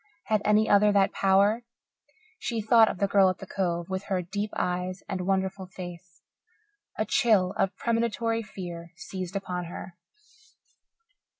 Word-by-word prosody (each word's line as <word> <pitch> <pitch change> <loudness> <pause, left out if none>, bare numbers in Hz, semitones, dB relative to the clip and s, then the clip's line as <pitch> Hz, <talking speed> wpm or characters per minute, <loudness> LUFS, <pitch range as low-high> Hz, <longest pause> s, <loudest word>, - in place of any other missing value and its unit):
Had 215 -2 +1
any 210 +1 +3
other 205 +1 +5
that 195 -1 +3
power? 200 +4 +3 0.8
She 230 -2 -2
thought 220 +1 +5
of - - -4
the 200 - +2
girl 195 -1 +5
at 185 - -2
the - - -9
Cove, 175 -4 -2
with 190 +1 -4
her 185 -2 -1
deep 205 +4 -3
eyes 180 +1 -2
and 185 -1 -3
wonderful 190 0 -1
face. 175 -2 -10 0.7
A - - 0
chill 215 -9 +3
of 195 -3 0
premonitory 230 0 0
fear 175 -5 -8
seized 185 +1 -6
upon 180 -2 -3
her. 175 +1 -8
195 Hz, 145 wpm, -27 LUFS, 180-210 Hz, 0.8 s, other